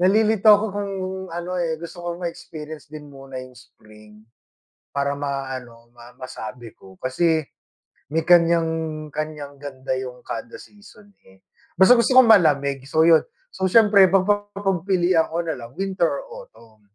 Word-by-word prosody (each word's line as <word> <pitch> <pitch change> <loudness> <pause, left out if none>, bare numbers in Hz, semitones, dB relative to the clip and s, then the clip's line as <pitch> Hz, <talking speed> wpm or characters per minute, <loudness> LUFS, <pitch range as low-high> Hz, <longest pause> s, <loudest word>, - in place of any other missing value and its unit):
Nalilito 215 +3 +3
ako 205 +1 +4
kung 200 0 -4 0.4
ano, 175 +2 -4
eh, 165 -2 -1
gusto 175 +1 -9
kong 175 0 -5
ma-experience 155 -2 -8
din 150 -1 -10
muna 135 -2 -9
yung 130 -1 -13
spring 105 0 -18 0.7
para 140 0 0
ma-ano 130 -4 -6
ma 120 +1 -15
masabi 120 -2 -8
ko. 95 -1 -17
Kasi 160 +5 +1 0.7
may 160 +1 0
kanyang, 165 -2 +2
kanyang 150 -2 -5
ganda 130 -2 -5
yung 125 -1 -7
kada 235 -3 -7
season, 205 0 -17 0.2
eh. 95 0 -21 0.4
Basta 190 +6 +8
gusto 235 - +2
kong 255 -3 +8
malamig 140 -8 +3
so 160 +3 +2
yun. 165 -2 +6 0.3
So 190 0 -1
siyempre 210 -3 +6
mapagpipilian 195 -3 +1
ko 165 - -2
nalang 125 -7 -6
winter 190 -3 0
or - - -8
autumn. 110 -2 -21
160 Hz, 140 wpm, -22 LUFS, 135-190 Hz, 0.7 s, Basta